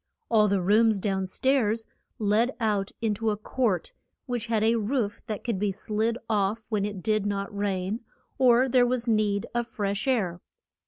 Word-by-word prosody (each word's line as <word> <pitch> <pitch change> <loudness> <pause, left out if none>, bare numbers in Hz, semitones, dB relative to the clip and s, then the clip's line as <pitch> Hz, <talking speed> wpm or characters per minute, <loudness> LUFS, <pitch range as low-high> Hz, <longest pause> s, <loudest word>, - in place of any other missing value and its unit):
All 215 -2 +5
the 195 -2 +1
rooms 215 +3 +4
down 190 -1 -1
stairs 230 0 +1 0.3
led 220 +4 +1
out 210 -4 0
in 220 -2 +1
to 220 +2 -1
a 210 - -1
court, 215 -4 -1 0.3
which 240 -2 -3
had 225 -2 +1
a 225 +1 +4
roof 220 -1 -1
that 215 -2 -4
could 230 -6 -2
be 205 0 +1
slid 215 +3 -1
off 215 +1 0
when 210 -3 0
it 205 -3 -5
did 215 -2 +1
not 200 +1 -3
rain, 200 +1 -1 0.4
or 255 0 +5
there 250 -1 +4
was 245 -1 -1
need 210 -3 +1
of 240 -1 -1
fresh 205 0 -3
air. 190 -9 0
215 Hz, 175 wpm, -27 LUFS, 200-230 Hz, 0.4 s, All